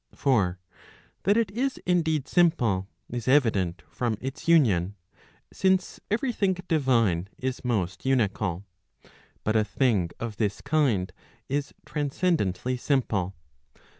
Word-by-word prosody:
For 100 -10 +2 0.7
that 205 +3 +4
it 225 -4 +1
is 260 +5 -1
indeed 160 -6 +1
simple, 120 - +2 0.2
is 120 0 -5
evident 100 - +2
from 115 -4 -1
its 135 +4 -6
union; 105 - +4 0.6
since 190 -1 +1
every 240 +4 0
thing 195 -3 +1
divine 115 - +2
is 130 0 -3
most 100 -7 -1
unical. 105 -8 0 0.8
But 110 - 0
a 110 - +4
thing 105 -5 +1
of 115 -3 -5
this 105 -2 -1
kind 135 -11 +1 0.4
is 140 +1 -2
transcendently 140 - 0
simple. 110 -9 0
125 Hz, 115 wpm, -27 LUFS, 100-155 Hz, 0.8 s, that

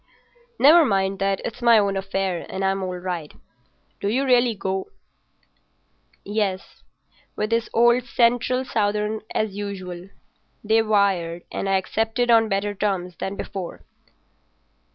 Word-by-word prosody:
"Never 325 +4 +7
mind 195 -6 0
that—it's 195 +5 -2
my 235 -1 +6
own 200 -2 +2
affair, 195 -2 -2
and 195 0 -3
I'm 195 0 0
all 185 -1 -3
right. 175 -4 -5 0.7
Do - - -2
you 260 +6 +1
really 245 -3 +3
go?" 190 -1 -3 1.4
"Yes. 200 -2 -3 0.5
With 215 +1 -2
the 230 0 0
old 240 +1 +3
Central 245 +1 +1
Southern 210 -1 -1
as 215 -2 0
usual. 190 -3 -6 0.5
They 220 +1 +3
wired, 195 -6 +1
and 195 - -3
I - - +2
accepted 225 +5 0
on 225 -1 +5
better 200 +1 -1
terms 190 -3 -2
than 195 - -3
before." 190 -3 -6
205 Hz, 130 wpm, -23 LUFS, 190-225 Hz, 1.4 s, Never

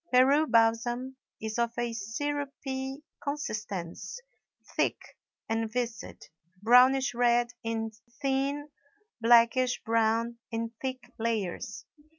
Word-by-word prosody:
Peru 275 +5 +5
balsam 240 +2 +2 0.2
is 220 +1 -3
of 235 0 +1
a 240 -1 -1
syrupy 270 +4 -4 0.2
consistence, 215 - -4 0.6
thick - - +2 0.5
and 225 0 -1
viscid, 235 -2 -4 0.4
brownish 255 +3 +6
red 240 0 +3
in 225 -1 -2 0.3
thin, 280 +1 0 0.5
blackish 240 +2 +5
brown 230 +1 +1
in 230 -1 -3
thick 255 -2 -5
layers. 220 -5 -2
240 Hz, 95 wpm, -29 LUFS, 225-265 Hz, 0.6 s, brownish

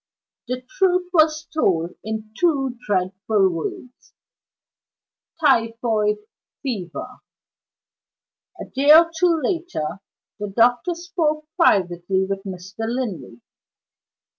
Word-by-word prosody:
The 255 +1 -4
truth 360 +1 +1
was 310 -2 +4
told 180 - 0
in 220 0 -5
two 270 -5 +1
dreadful 195 +1 +1
words: 180 +8 -7 1.2
"Typhoid 230 -6 +2 0.5
Fever." 225 - -5 1.4
A - - -5
day 280 +3 +3
or 330 +1 +7
two 335 0 +3
later, 330 - -2 0.4
the 210 - -3
doctor 245 - +2
spoke 330 -3 -1
privately 190 - +2
with 195 0 -3
Mr. 190 +4 -6
Linley. 190 - -4
230 Hz, 90 wpm, -22 LUFS, 195-310 Hz, 1.4 s, or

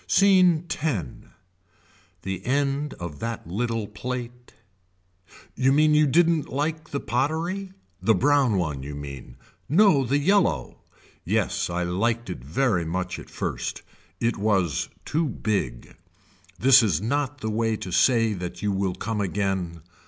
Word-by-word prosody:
Scene 185 -4 +4
X. 140 - -3 1.0
The 95 -1 -4
end 140 +3 0
of 85 -4 -7
that 115 -1 -4
little 115 +5 -2
plate. 120 +3 -6 1.0
You 130 +1 +3
mean 150 +2 +4
you 150 0 +5
didn't 165 +1 +3
like 155 +4 -2
the 140 - -2
pottery. 165 +11 -2 0.3
The 110 - +3
brown 140 -6 +3
one 75 -7 -2
you 70 +2 -6
mean. 70 -4 -9 0.3
No 170 -3 +5
the 135 +3 +1
yellow. 165 - +1 0.4
Yes - - 0
I 90 +1 -1
liked 110 +5 -1
it - - -7
very 90 - +1
much 90 +2 -3
at - - -12
first. - - -4 0.4
It 115 0 0
was 95 - 0 0.2
too 160 +1 0
big. 95 - -3 0.6
This 130 +5 +7
is 95 -9 +1
not 140 +6 -2
the 110 - -2
way 115 +1 0
to 90 - -7
say 115 +2 +3
that 90 -1 -6
you 105 - +1
will 95 -2 -1
come 105 +2 -3
again. 95 -4 -2
115 Hz, 140 wpm, -25 LUFS, 90-145 Hz, 1.0 s, This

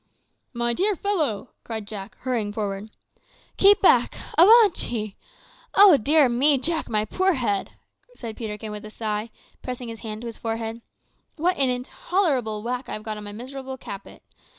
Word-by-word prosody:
"My 235 -1 -1
dear 400 - +2
fellow!" 310 - -1
cried 220 -2 -5
Jack, 200 -2 -7
hurrying 235 -5 -1
forward. 205 0 -4 0.7
"Keep 400 +1 +5
back! - - +4 0.2
avaunt 425 +2 +6
ye. 215 -4 -3 0.6
Oh 395 -4 +9
dear 290 +3 +4
me, 270 +4 +3
Jack, 320 +4 -1
my 215 -1 +1
poor 375 - +1
head!" 215 -8 -1 0.4
said 230 - -7
Peterkin 215 -1 -6
with 210 0 -7
a 215 - -8
sigh, 215 0 -3 0.3
pressing 250 -1 -6
his 225 -1 -8
hand 220 -1 -6
to - - -8
his 230 -1 -7
forehead; 225 0 -4 0.5
"what 350 +3 +1
an 270 -2 +2
intolerable 250 - -1
whack 250 +2 -4
I - - -4
have 215 - -5
got 215 -1 -4
on 210 - -8
my 205 - -6
miserable 265 +4 -7
caput. 200 -5 -10
235 Hz, 165 wpm, -24 LUFS, 215-290 Hz, 0.7 s, Oh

